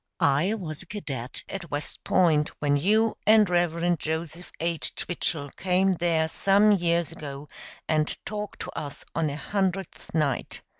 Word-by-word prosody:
I 150 +10 +3
was 160 -8 -6
a 190 - -12
cadet 135 - -5
at 185 -4 -6
West 145 +1 -5
Point 155 -5 +3
when 145 -1 +2
you 215 +9 +3
and 215 -1 +7
Rev. 175 -1 +1
Joseph 160 +2 -4
H. 170 -1 -1
Twichell 150 -5 -2
came 190 +1 +2
there 165 -2 +2
some 200 +5 +4
years 170 -3 +2
ago 145 -3 -8 0.4
and 155 -1 +2
talked 210 0 -5
to - - -5
us 145 -2 -6
on 160 -2 +1
a 140 - -4
Hundredth 195 +2 -2
Night. 145 -5 0
170 Hz, 150 wpm, -26 LUFS, 150-190 Hz, 0.4 s, and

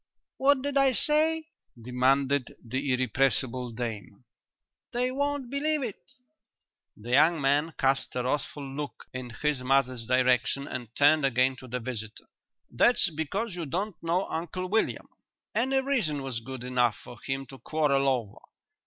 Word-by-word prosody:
"What 270 0 +3
did 285 0 -1
I 270 -1 +5
say?" 315 +4 +2 0.3
demanded 130 +3 +1
the 130 +4 -2
irrepressible 130 0 +1
dame. 110 -3 -6 0.7
"They 250 +1 0
won't 285 -1 -2
believe 300 +1 0
it." 240 +3 -7 0.8
The 115 +3 -8
young 155 +5 +5
man 145 +3 +1
cast 135 0 +1
a 125 - 0
wrathful 140 +2 -2
look 140 +2 -6
in 130 -1 -5
his 150 +4 -1
mother's 130 -2 +1
direction 130 +2 +2
and 125 -2 -5
turned 145 +1 +5
again 130 0 +3
to 130 - -11
the 125 +1 -3
visitor. 110 -3 -6 0.5
"That's 240 -6 +3
because 185 +8 -3
you 170 -3 -5
don't 190 +7 -2
know 170 +3 0
Uncle 175 +3 -4
William. 220 +4 0 0.5
Any 265 +3 +2
reason 215 - 0
was 130 -3 -3
good 130 +1 -8
enough 125 -3 +2
for 120 - -12
him 135 0 -3
to 135 - -11
quarrel 140 -3 +1
over. 120 -6 -2
140 Hz, 145 wpm, -28 LUFS, 125-195 Hz, 0.8 s, I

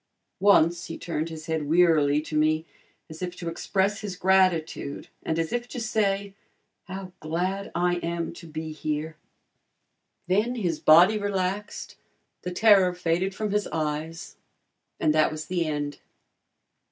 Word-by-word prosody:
Once 175 -4 +4
he 165 - -6
turned 165 -1 -3
his 160 -1 -8
head 160 -3 -2
wearily 155 -4 +4
to 155 0 -7
me 155 +1 +2 0.4
as 155 +2 -11
if 180 -1 -4
to 175 - -7
express 195 +4 0
his 205 -3 -5
gratitude 180 -6 +1
and 160 - -2
as 165 -1 -1
if 240 0 -2
to 245 - -6
say, 200 -3 0 0.5
"How 190 0 -7
glad 180 +5 -2
I 175 +1 +1
am 170 -1 -3
to 170 - -11
be 155 0 -5
here." 155 +1 -3 1.1
Then 210 +7 +1
his 175 -9 -1
body 180 +7 +6
relaxed, 200 0 -3 0.4
the 180 - -4
terror 190 -1 +5
faded 180 +2 0
from 215 -1 -2
his 210 0 0
eyes, 155 +1 -4 0.6
and 150 - +3
that 155 0 +4
was 155 0 -5
the 170 0 -1
end. 145 -1 -3
175 Hz, 145 wpm, -26 LUFS, 155-195 Hz, 1.1 s, body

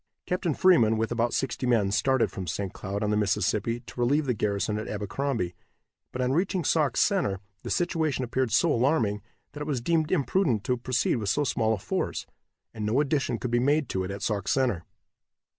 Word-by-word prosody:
Captain 180 -4 -1
Freeman, 120 -13 +5
with 115 +1 -1
about 120 0 +1
sixty 130 -1 -2
men, 110 -5 +2
started 125 +6 +2
from 95 -2 -6
St. 95 +3 -3
Cloud, 100 +1 -4
on 105 - 0
the - - +2
Mississippi, 105 +3 0
to 120 - -11
relieve 140 +5 +2
the 125 - +1
garrison 105 0 -1
at 110 - -5
Abercrombie, 105 -1 -2 0.6
but 125 - -2
on 125 - +1
reaching 180 +4 0
Sauk 150 -3 +1
Center 180 - +2 0.2
the - - -6
situation 160 -7 0
appeared 125 0 -1
so 150 +8 +3
alarming 115 -5 +1 0.3
that 150 - -8
it 150 - -4
was 140 -5 0
deemed 155 +5 0
imprudent 145 - +1
to 125 - +1
proceed 125 0 0
with 105 -4 -2
so 145 - +2
small 110 -5 +1
a - - -7
force, - - -3 0.5
and 110 - -5
no 110 +6 +1
addition 145 -2 0
could 125 - -4
be 120 - +3
made 145 +2 +2
to 95 - -1
it 95 - -4
at 100 +1 -5
Sauk 100 -3 -1
Center. 120 -11 +1
120 Hz, 200 wpm, -27 LUFS, 105-145 Hz, 0.6 s, Freeman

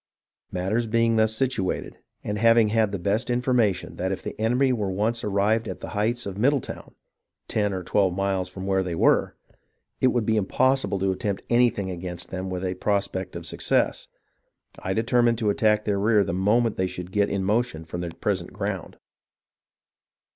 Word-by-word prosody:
Matters 100 +6 -1
being 115 0 +2
thus 110 0 +2
situated, 125 -6 -2 0.2
and 105 0 -3
having 115 -1 +5
had 110 -1 +2
the 100 - -2
best 100 +7 0
informa 125 -4 +2
tion - - -9
that 95 +2 -1
if 95 - -4
the - - -5
enemy 125 +4 +2
were 105 -5 -1
once 110 +5 -1
arrived 105 +3 +1
at - - -5
the - - -7
heights 115 +4 -1
of 100 0 -5
Middle 140 +5 +3
town, - - -9 0.5
ten 105 -2 0
or 95 -1 -4
twelve 95 -1 +1
miles 95 -1 -1
from 95 0 -7
where 95 -1 +2
they 90 -2 -3
were, - - +3 0.6
it 130 - +4
would 120 -3 +1
be 110 0 +2
impossible 110 0 +1
to 95 0 +1
attempt 100 +1 -3
anything 120 -6 +2
against 90 -1 -6
them 95 0 -4
with 90 0 -3
a 90 - -1
prospect 100 -1 -2
of - - -6
success, - - 0 0.7
I 95 0 -3
determined 115 +1 +2
to 110 -3 +1
attack 105 0 +2
their 100 -2 0
rear 105 0 +4
the 85 - -3
moment 105 +5 +2
they 95 - +1
should 90 0 -7
get 100 0 +2
in 100 -1 -1
motion 105 -5 0
from 85 +2 -5
their 85 - -3
present 90 +1 -2
ground. - - -4
105 Hz, 185 wpm, -25 LUFS, 95-115 Hz, 0.7 s, having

